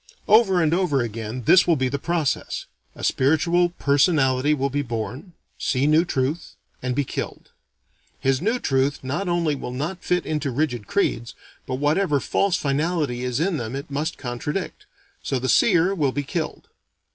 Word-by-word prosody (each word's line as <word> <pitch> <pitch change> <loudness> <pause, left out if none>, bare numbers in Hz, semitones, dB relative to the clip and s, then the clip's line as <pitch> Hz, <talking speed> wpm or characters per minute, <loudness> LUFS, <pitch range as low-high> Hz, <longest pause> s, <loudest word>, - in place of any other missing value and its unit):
Over 200 -5 +5
and 155 0 +2
over 170 -7 +2
again, 115 +1 -5
this 180 +11 +5
will 170 - +4
be 130 -3 0
the 140 +2 -2
process: 165 -2 -1 0.3
A - - -10
spiritual 170 +6 +2
personality 140 -3 +2
will 140 -2 0
be 145 +2 0
born; 120 - -5 0.3
see 130 0 +1
new 155 +3 +4
truth; 145 +2 -2 0.3
and 125 -1 -2
be 145 - +1
killed. - - -6 0.7
His 135 0 +1
new 225 +6 +1
truth 135 - 0
not 170 +9 -2
only 170 -3 +1
will 135 - -5
not 155 +8 -4
fit 180 -1 0
into 150 -2 -2
too 125 - -6
rigid 125 -7 -1
creeds, 120 - -1 0.3
but 130 - -2
whatever 150 +2 +1
false 195 +6 +1
finality 145 -4 -1
is 125 +1 -1
in 170 +1 +1
them 120 -1 -4
it 140 +2 -7
must 150 +4 -2
contradict. 140 +9 -4 0.3
So, 135 - -1
the 130 +1 -2
seer 180 - +4
will 150 -8 +1
be 145 +2 -2
killed. 155 +3 -4
145 Hz, 170 wpm, -23 LUFS, 130-175 Hz, 0.7 s, Over